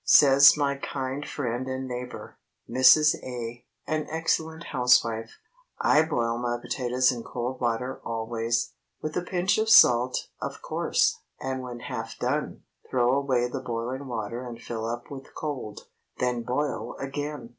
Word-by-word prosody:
Says 140 +1 +7
my 140 -1 0
kind 135 +1 -4
friend 125 -2 -3
and 130 0 -4
neighbor, 125 0 -7 0.3
Mrs. 150 +4 +6
A., 120 -1 -6 0.2
an 155 -1 -2
excellent 160 0 -1
housewife—"I 125 - +1
boil 120 -7 -1
my 120 0 -1
potatoes 125 +1 +1
in 120 -2 -5
cold 125 +3 -5
water 120 +2 -1
always—with 115 +6 -3
a - - +1
pinch 180 +3 0
of 220 0 +1
salt, 125 - +6
of - - -5
course, - - +1 0.2
and 130 0 -3
when 120 -2 -7
half 115 -4 -6
done, 135 +5 -2 0.3
throw 125 -1 +2
away 135 -3 +1
the 130 +2 -4
boiling 125 +3 -4
water 115 0 -4
and 120 -2 -8
fill 115 -1 -5
up 120 +3 -5
with 135 -1 -10
cold, 135 -9 -5 0.4
then 125 -1 0
boil 130 +5 -2
again. 145 -2 -5
125 Hz, 140 wpm, -26 LUFS, 120-140 Hz, 0.4 s, Says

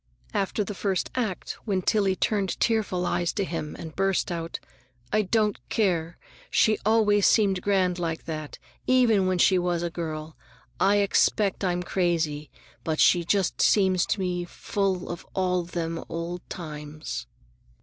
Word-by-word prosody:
After 200 +2 0
the 205 - -5
first 190 -1 -1
act, 220 -8 -3
when 190 -4 0
Tillie 200 -2 +2
turned 200 -1 0
tearful 210 -6 +1
eyes 175 -1 0
to 200 - -1
him 165 -4 -4
and 160 -2 -8
burst 195 -1 +1
out, 165 -1 -4 0.5
"I 215 - +4
don't 210 0 +1
care, 175 -6 0 0.3
she 215 -1 +3
always 210 -2 +4
seemed 195 -4 +3
grand 185 -3 +1
like 165 -2 -3
that, 155 -2 -5 0.3
even 230 -7 +4
when 185 -1 +1
she 185 +1 +4
was 175 -1 0
a 170 - -2
girl. 155 -1 -5 0.4
I 195 +2 +4
expect 200 0 +2
I'm 180 -1 0
crazy, 160 -5 -1 0.3
but 160 -1 -2
she 175 -1 +5
just 190 +1 0
seems 190 -3 +3
to - - 0
me 180 -2 -1
full 190 +1 -2
of 175 - -6
all 180 -1 +1
them 165 -1 -4
old 170 +1 -4
times!" 150 - -6
180 Hz, 150 wpm, -26 LUFS, 170-200 Hz, 0.5 s, she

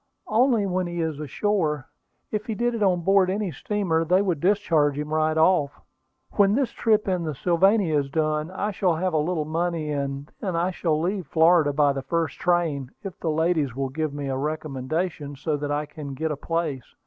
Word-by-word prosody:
"Only 230 -1 +3
when 185 -1 -1
he 175 0 -4
is 160 -3 -2
ashore. 155 -1 -1 0.5
If 215 0 -3
he 220 - -2
did 240 +2 0
it 230 - -3
on 185 -3 +3
board 195 +1 +4
any 200 -1 -1
steamer, 165 +1 -1
they 180 +3 +3
would 180 -6 0
discharge 165 -6 +2
him 150 +1 -4
right 155 0 +1
off. 160 -3 +3 0.6
When 200 0 +5
this 270 -1 +1
trip 215 -2 +1
in 180 -3 0
the 155 -3 -3
Sylvania 175 - +3
is 140 -1 -3
done, 155 +1 0
I 200 +3 -2
shall 180 -3 +1
have 180 +2 -1
a - - +2
little 155 0 -1
money, 165 -1 -1
and 140 0 -3
then 185 -4 -3
I 175 +2 +1
shall 160 -4 0
leave 180 0 -2
Florida 160 -1 +4
by 145 -1 +3
the 135 - -3
first 165 +4 -2
train, 165 -7 0
if 195 -3 -7
the 165 - -2
ladies 155 -4 +1
will 135 0 -2
give 155 +2 -2
me 145 -1 -5
a 135 - -1
recommendation 150 +1 -3
so 150 +3 -2
that 145 0 -4
I 145 +1 -1
can 145 -2 -8
get 160 +3 -2
a - - -1
place. 155 -4 -3
160 Hz, 205 wpm, -25 LUFS, 150-185 Hz, 0.6 s, When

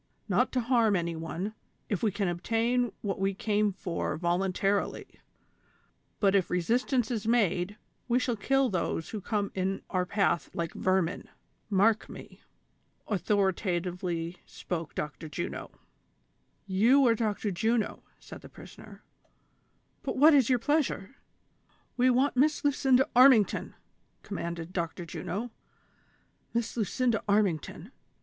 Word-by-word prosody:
Not - - +2
to 255 - +1
harm 230 -3 +3
any 170 -2 -1
one, 165 +6 -4 0.3
if 205 - -2
we 220 - +2
can 200 0 -1
obtain 230 +7 0
what 200 -2 -3
we 195 0 0
came 210 0 +1
for 180 -2 -3
voluntarily; 190 +3 0 1.1
but 195 -2 +3
if 195 -3 +2
re 180 - +1
sistance 245 - 0
is 220 -2 -3
made, 205 -4 +1 0.3
we 240 0 +2
shall 250 -1 0
kill 270 +5 +2
those 170 -5 -2
who 215 - -5
come 205 0 -2
in 190 +1 -2
our 180 -1 0
path 195 -5 +1
like 170 -1 -3
vermin; 185 -2 0 0.4
mark 215 +2 +2
me! - - -11 0.3
" - - -41
authoritatively 180 -3 -1
spoke 165 -3 -6
Dr. 155 +1 -5
Juno. 150 - -5 1.0
"You 230 +9 +4
are 235 - +5
Dr. 215 -2 -1
Juno," 220 +4 0 0.2
said - - -11
the - - -12
prisoner; - - -13 1.0
"but - - -4
what 305 +4 +7
is 270 -4 +4
your 255 - +4
pleasure 270 -4 -1 0.4
?" - - -31
"AVe 255 +1 +5
want 260 +3 +2
Miss 295 +3 +2
Lucinda 265 -1 +3
Armington!" 250 -5 +5 0.5
commanded 170 -3 -5
Dr. 170 0 -3
Juno. 210 +7 -5 0.5
" - - -39
Miss 235 -1 -1
Lucinda 235 +1 0
Armington 200 -7 0
205 Hz, 135 wpm, -29 LUFS, 180-240 Hz, 1.1 s, what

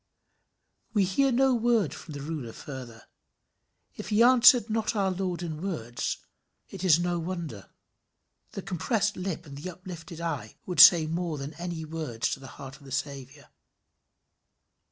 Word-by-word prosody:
We 205 - +4
hear 275 +10 +2
of 250 - 0
no 265 +1 +4
word 230 - +2
from 155 -2 -9
the 140 - -6
ruler 145 -7 -5
further. 125 -5 -9 0.9
If - - -7
he 215 +2 +4
answered 245 -2 +7
not 225 0 -1
our 195 -2 +1
Lord 180 -2 -3
in 160 -2 -5
words, 150 -12 -3 0.5
it - - -8
is 170 -4 +6
no 175 0 -1
wonder. 165 - -6 0.8
The 195 - -6
compressed 200 +3 0
lip 180 -2 -4
and 140 -2 -10
the 185 - -5
uplifted 175 -2 -9
eye 150 -11 -4
would 180 -4 -3
say 165 0 +10
more 165 0 -2
than 140 +2 -6
any 170 0 -5
words 155 -8 -3
to - - -3
the 135 - -11
heart 135 0 -9
of 145 - -20
the 135 - -11
Saviour. 140 +1 -5
170 Hz, 160 wpm, -28 LUFS, 145-195 Hz, 0.9 s, say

